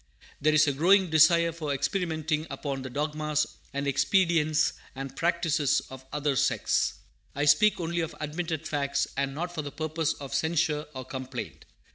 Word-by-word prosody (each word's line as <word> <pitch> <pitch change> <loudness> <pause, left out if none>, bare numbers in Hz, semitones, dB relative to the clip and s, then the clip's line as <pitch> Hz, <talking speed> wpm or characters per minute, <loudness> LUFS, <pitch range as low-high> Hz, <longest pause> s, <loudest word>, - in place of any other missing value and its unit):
There 155 +1 +3
is 155 +1 +6
a 145 - +1
growing 180 +5 +4
desire 170 +2 +5
for 155 -3 -4
experimenting 160 +1 -1
upon 140 -2 -4
the 130 - -6
dogmas 150 +2 -1 0.3
and 140 +1 -3
expedients 155 +1 +2 0.2
and 135 0 -6
practices 165 -3 +1
of 130 0 -10
other 145 -1 0
sects. - - +1 0.4
I 145 +1 0
speak 205 +10 +5
only 170 0 -2
of 165 -2 -3
admitted 160 +1 -3
facts, 140 -1 0
and 135 0 -1
not 175 +3 -4
for 160 - -3
the 145 -1 -6
purpose 155 +1 -1
of 140 -1 -9
censure 155 0 0
or 130 -1 -6
complaint. 130 -1 -7
150 Hz, 160 wpm, -28 LUFS, 140-165 Hz, 0.4 s, is